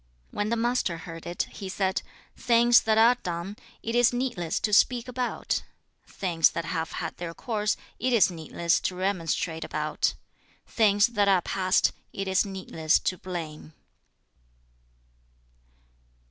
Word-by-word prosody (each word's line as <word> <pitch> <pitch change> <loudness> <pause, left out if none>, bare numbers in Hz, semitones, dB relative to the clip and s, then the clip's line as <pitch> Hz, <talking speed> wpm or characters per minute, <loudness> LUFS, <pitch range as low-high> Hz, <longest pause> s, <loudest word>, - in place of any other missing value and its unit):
2. - - -13
When 205 +1 0
the 235 - +1
Master 235 -7 0
heard 165 0 -9
it, 175 0 -1
he 195 - -7
said, 190 0 -1 0.3
'Things 240 0 +5
that 220 0 +1
are 230 +2 +7
done, 175 +3 -4 0.3
it 230 - -3
is 240 0 +4
needless 240 -10 -2
to 210 - -1
speak 240 +3 +4
about; 250 0 -2 0.5
things 170 -4 +2
that 170 - -4
have 165 -1 -3
had - - -5
their 170 -1 -6
course, 215 -3 -1 0.2
it 255 +2 0
is 225 -6 +5
needless 170 0 0
to 185 - -2
remonstrate 175 -3 -1
about; - - -1 0.5
things 205 -2 +3
that 210 -4 +1
are 190 -3 +4
past, 185 -1 +2 0.2
it 195 0 -4
is 190 0 +3
needless 170 -4 0
to 185 - -1
blame.' 165 -4 -7
195 Hz, 145 wpm, -27 LUFS, 170-230 Hz, 0.5 s, are